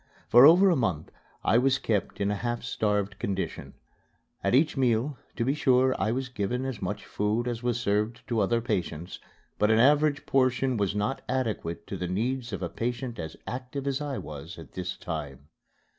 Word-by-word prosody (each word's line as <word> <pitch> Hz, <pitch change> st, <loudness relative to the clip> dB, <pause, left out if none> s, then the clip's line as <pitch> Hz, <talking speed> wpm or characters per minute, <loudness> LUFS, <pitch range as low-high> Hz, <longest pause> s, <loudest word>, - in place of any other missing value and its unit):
For 125 Hz, +4 st, +9 dB
over 185 Hz, +4 st, +7 dB
a -, -, +3 dB
month 95 Hz, -, -1 dB, 0.3 s
I 115 Hz, -, +4 dB
was 135 Hz, +1 st, +3 dB
kept 105 Hz, -7 st, -1 dB
in 100 Hz, 0 st, +1 dB
a -, -, 0 dB
half 120 Hz, +3 st, -3 dB
starved 105 Hz, -4 st, -1 dB
condition. 95 Hz, -1 st, -3 dB, 0.7 s
At -, -, +3 dB
each 150 Hz, +4 st, +3 dB
meal, 125 Hz, +1 st, +1 dB, 0.2 s
to 115 Hz, -, -1 dB
be 135 Hz, -, +2 dB
sure, 130 Hz, -3 st, +3 dB
I 110 Hz, -, +1 dB
was 130 Hz, +2 st, -2 dB
given 125 Hz, +2 st, -2 dB
as 130 Hz, -5 st, -4 dB
much -, -, -4 dB
food 105 Hz, +4 st, -1 dB
as 120 Hz, -2 st, -3 dB
was 120 Hz, -1 st, 0 dB
served 105 Hz, +2 st, -1 dB
to 115 Hz, -2 st, 0 dB
other 115 Hz, +4 st, +2 dB
patients, 90 Hz, -8 st, -3 dB, 0.4 s
but 105 Hz, -, +3 dB
an 110 Hz, -, +4 dB
average 145 Hz, +4 st, +4 dB
portion 130 Hz, -1 st, +2 dB
was 100 Hz, -2 st, 0 dB
not 105 Hz, +6 st, -1 dB
adequate 115 Hz, -10 st, -2 dB
to -, -, -5 dB
the 90 Hz, -, -3 dB
needs 120 Hz, +6 st, -2 dB
of 95 Hz, -2 st, -4 dB
a -, -, 0 dB
patient 120 Hz, +1 st, -4 dB
as 80 Hz, -1 st, -6 dB
active 130 Hz, +2 st, -5 dB
as 140 Hz, 0 st, -1 dB
I 145 Hz, -2 st, -3 dB
was 75 Hz, -2 st, -8 dB
at -, -, -11 dB
this 90 Hz, -1 st, -5 dB
time. 75 Hz, -4 st, -6 dB
120 Hz, 190 wpm, -28 LUFS, 100-130 Hz, 0.7 s, For